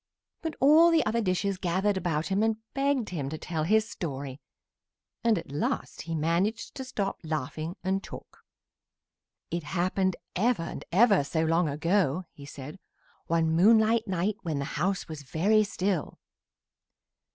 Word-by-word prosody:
But 320 -3 -4
all 310 +5 +7
the 330 -2 +3
other 230 +2 +1
dishes 190 -1 0
gathered 190 +4 +1
about 165 -4 -1
him 195 +1 +1
and 220 0 +2 0.2
begged 275 -4 +1
him 145 -7 -3
to 155 - -5
tell 155 -1 -3
his 220 +4 +3
story, 140 - -5 0.8
and 230 -3 +3
at 165 - -6
last 145 - -2
he 165 0 -4
managed 170 +8 0
to 265 - -6
stop 205 -6 -3
laughing 155 +2 -3
and 190 +1 0
talk. - - -11 1.1
"It 170 +1 -1
happened 185 +3 0 0.2
ever 220 -1 +2
and 165 - -6
ever 200 -2 +5
so 160 +3 -1
long 165 0 +2
ago," 170 +2 +1
he 140 -1 -12
said, 145 +5 -9 0.5
"one 165 -1 +2
moonlight 220 +6 +4
night 190 +2 -1
when 160 -5 -2
the 140 - -2
house 180 +5 -1
was 155 -3 -7
very 195 +10 +2
still. 190 -4 -2
185 Hz, 150 wpm, -28 LUFS, 160-215 Hz, 1.1 s, all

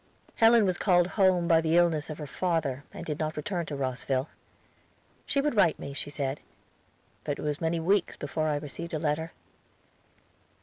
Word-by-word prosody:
Helen 225 -1 +6
was 185 -2 0
called 175 -2 +3
home 185 -4 +3
by 165 -2 +5
the 165 +1 +2
illness 165 -4 +2
of 155 - -5
her 150 - -6
father 150 -4 -1
and - - -8
did 150 -1 -4
not 155 -1 -2
return 175 +1 -3
to 145 - -4
Rosville. 130 +1 -2 1.0
She 280 - +2
would 295 -3 0
write 170 -6 +4
me, 140 - -7
she 140 - -4
said; 140 -1 -3 0.8
but 145 - -2
it - - -7
was 150 +2 -2
many 165 +1 0
weeks 185 +3 +1
before 155 +2 -2
I 150 - +1
received 150 +3 -5
a - - +1
letter. 160 +1 -1
160 Hz, 180 wpm, -28 LUFS, 145-175 Hz, 1.0 s, Helen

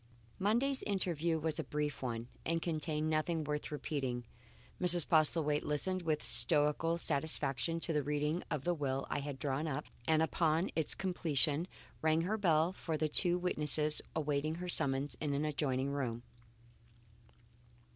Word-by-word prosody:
Monday's 240 +7 +1
interview 170 -5 -1
was 160 0 -3
a - - -1
brief 150 -1 -3
one 120 -2 -4 0.2
and 165 +1 0
contained 155 -2 -2
nothing 155 +1 -1
worth 150 0 -4
repeating. 135 -4 -3 0.6
Mrs. 175 -2 +5
Postlethwaite 155 -2 +2
listened 185 +5 0
with 155 -3 -1
stoical 155 +1 +5
satisfaction 160 0 +1
to 165 - +1
the 150 - +1
reading 150 +4 -1
of 145 -3 -3
the 175 - +1
will 135 -4 -2
I - - -1
had 140 -1 -6
drawn 140 +3 -2
up, 150 0 -3 0.2
and 160 0 +3
upon 160 +2 0
its 160 -3 +2
completion 160 -3 0 0.3
rang 160 +1 +2
her 210 +6 -2
bell 165 -2 +2
for 165 -4 -4
the 155 0 -1
two 175 +3 +3
witnesses 150 -3 +3
awaiting 150 0 -1
her 180 +1 -6
summons, 140 -3 -1
in 145 -2 -1
an 145 +2 -1
adjoining 140 -3 -1
room. 120 -4 -3
155 Hz, 150 wpm, -34 LUFS, 145-165 Hz, 0.6 s, Mrs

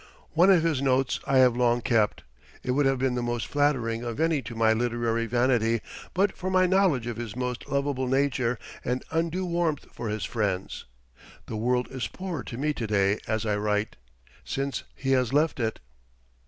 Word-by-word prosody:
One 175 +5 +5
of 180 -4 +6
his 160 -5 +1
notes 135 -1 +1
I 135 - +3
have 125 -2 +6
long 120 -1 +2
kept. 110 -3 +1 0.4
It 125 - -1
would 140 +2 +3
have 135 0 +2
been 130 0 0
the 125 - -1
most 120 -1 -2
flattering 130 -6 +1
of 115 -2 -4
any 160 -3 +2
to 115 -1 -8
my 110 0 +4
literary 115 0 0
vanity 120 -1 +2 0.4
but 195 +2 +2
for 185 - -4
my 185 0 +4
knowledge 180 - +3
of 120 -2 -4
his 115 -3 -5
most 125 -1 -4
lovable 140 -2 0
nature 130 -2 +1 0.3
and 125 +1 -1
undue 170 +3 0
warmth 170 -4 -1
for 115 - -4
his 105 -1 -2
friends. 100 -5 -2 0.6
The 110 - -6
world 125 +3 +1
is 130 -2 -3
poorer 180 -6 -5
to 115 - -7
me 150 +3 0
to 115 -5 -4
day 100 0 +2
as 110 0 -1
I 105 -1 +1
write, 105 0 -1 0.5
since 140 0 -2
he 135 0 -2
has 130 -2 +2
left 150 0 +2
it. 110 -2 -1
125 Hz, 190 wpm, -27 LUFS, 115-145 Hz, 0.6 s, of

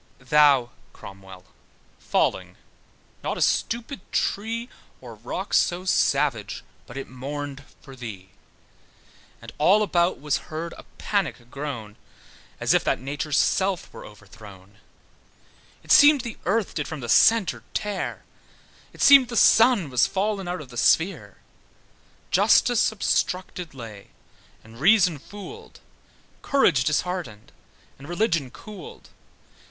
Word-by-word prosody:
Thou, 135 -2 +3 0.2
Cromwell, 95 -2 -13 0.5
falling, - - -1 0.7
not - - -3
a - - -5
stupid 235 0 -1
tree, 230 +3 -2 0.3
Or - - -11
rock - - -6
so 180 +1 +1
savage, 140 - 0 0.2
but 120 - -10
it 135 - -6
mourned 140 +2 -7 0.2
for 135 -2 -12
thee: 100 -7 -9 1.1
And - - -9
all 195 +8 +4
about 175 -3 +1
was 150 0 -3
heard 165 +2 -5
a - - -13
panic 160 - -3
groan, 130 -8 -6 0.6
As - - +2
if - - +2
that - - 0
Nature's 140 +3 -3
self 190 -2 0
were - - -10
overthrown. 100 -1 -15 1.0
It - - -6
seemed 290 -1 +7
the 235 -2 -8
earth 210 +1 0
did - - -3
from 160 -4 -7
the 120 - -6
centre 220 - +4
tear; 205 -2 -3 0.7
It - - -4
seemed 275 -3 +8
the 235 -1 -4
sun 225 - +5
was 125 -1 +3
fall'n 195 -1 -2
out 175 -2 -4
of 135 - -12
the 120 - -11
sphere: 165 +9 +1 0.9
Justice 245 -3 +3
obstructed 180 -6 -2
lay, 110 -5 -10 0.6
and 110 +1 -15
reason 180 -2 +4
fooled; 205 - -12 0.6
Courage 165 - +2
disheartened, 155 - -3 0.5
and 140 +3 -12
religion 175 - 0
cooled. 200 - -12
155 Hz, 125 wpm, -24 LUFS, 125-200 Hz, 1.1 s, seemed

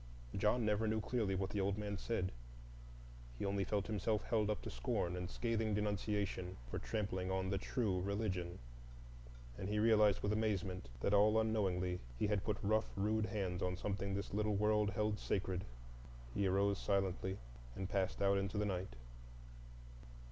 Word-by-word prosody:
John 105 +4 +2
never 105 +1 +2
knew 110 0 +1
clearly 110 -3 0
what 95 0 -1
the 100 - 0
old 100 +1 +1
man 105 -1 -2
said; 95 -1 -1 1.1
he - - -2
only 100 0 +1
felt 100 0 0
himself 105 0 0
held 110 -2 +1
up 105 - 0
to - - -5
scorn 85 +8 -1
and 90 -1 -3
scathing 110 -3 0
denunciation 100 -3 -1
for - - -1
trampling 95 -4 -2
on 95 0 0
the 100 - +1
true 100 -4 0
Religion, 95 -3 -1 1.0
and 95 - -3
he 105 - 0
realized 105 -2 +5
with 105 - +1
amazement 100 - -1
that 100 - +2
all 105 +2 +6
unknowingly 95 -5 +1 0.2
he - - +1
had 105 -2 +1
put 105 -2 0
rough, 110 +2 +2
rude 110 +2 +1
hands 95 -4 -2
on 90 -1 0
something 100 0 -2
this 100 0 -4
little 105 0 +1
world 105 0 +3
held 105 0 0
sacred. 95 -2 -1 0.7
He 100 - +1
arose 100 +1 +2
silently, 95 -1 0 0.4
and 95 - -3
passed 95 0 0
out 100 0 +4
into 100 +1 -2
the 105 - +2
night. 95 -8 -2
100 Hz, 165 wpm, -38 LUFS, 95-105 Hz, 1.1 s, all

